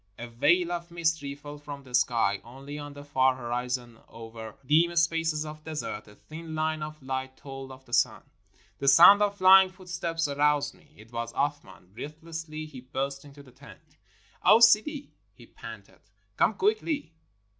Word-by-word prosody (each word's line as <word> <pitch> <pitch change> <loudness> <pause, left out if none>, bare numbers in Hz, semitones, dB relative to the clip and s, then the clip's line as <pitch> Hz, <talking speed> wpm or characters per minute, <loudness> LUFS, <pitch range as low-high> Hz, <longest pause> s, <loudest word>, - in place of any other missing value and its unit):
A 120 - -7
veil 170 +10 +2
of 170 0 -4
mystery 160 -4 -1
fell 145 0 -10
from 145 -1 -9
the 130 -2 -15
sky. 115 -5 +2
Only 135 +4 -9
on 145 0 -8
the 145 0 -10
far 130 -2 +2
horizon 120 -1 -4
over 115 -1 -10
dim 165 +5 +3
spaces 165 -2 +1
of 155 0 -9
desert 155 -10 -5
a 105 - -16
thin 160 +4 -9
line 155 0 -1
of 155 -1 -7
light 130 0 -4
told 135 -1 -9
of 130 0 -13
the 120 - -15
sun. - - +2 0.6
The 140 - -3
sound 175 +9 +8
of 205 -1 +1
flying 190 0 +7
footsteps 175 -3 -3
aroused 145 0 +1
me. 155 -5 -24
It 110 +2 -16
was 115 0 -4
Athman. 90 +2 -4
Breathlessly 155 +3 -7
he 135 -5 -11
burst 135 +2 -4
into 140 0 -14
the 130 - -17
tent. 135 +3 -17 0.5
"O 225 - +7
Sidi," 235 +6 +4 0.2
he - - -15
panted, - - -12 0.4
"come - - +2
quickly." 335 - -1
145 Hz, 165 wpm, -27 LUFS, 130-165 Hz, 0.6 s, sound